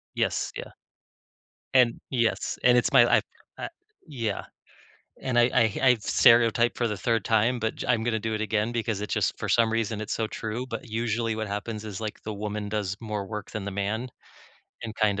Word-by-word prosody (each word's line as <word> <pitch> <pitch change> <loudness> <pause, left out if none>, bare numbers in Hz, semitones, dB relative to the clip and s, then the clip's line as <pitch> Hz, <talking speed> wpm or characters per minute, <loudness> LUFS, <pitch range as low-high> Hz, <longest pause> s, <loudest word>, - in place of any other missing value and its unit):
Yes, - - 0
yeah. - - -7 1.0
And 125 -2 +4
yes, 115 -4 0
and 125 0 +6
it's - - +1
my - - +7
I've - - +2 0.4
I - - -4 0.4
yeah. 115 -9 -3 0.8
And 125 -2 0
I 120 - +7
I 115 -4 +2
I've 125 -5 +4
stereotyped 115 0 +4
for 120 - +1
the 105 -2 -2
3rd 115 +1 0
time, 115 +3 +2
but 110 -1 -2
j - - -5
I'm 115 -3 +2
gonna 115 -1 +1
do 110 0 -2
it 110 - -2
again 110 +1 0
because 115 -3 -2
it 105 - -4
just, - - 0
for - - -4
some 115 -1 +3
reason, 115 -1 -1
it's 110 - -4
so 110 - -1
true, 110 +3 -4
but 130 -2 -6
usually 115 0 -1
what 110 -1 -3
happens 105 +2 -4
is, 105 -2 -6
like, 110 -1 -5
the 110 - -4
woman 105 0 -4
does 100 -2 -2
more 105 -3 -4
work 105 0 -6
than 105 -2 -5
the 100 - -3
man, 105 +5 -2 0.7
and, 110 -2 -5
kind 105 -2 +1
110 Hz, 200 wpm, -26 LUFS, 105-115 Hz, 1.0 s, my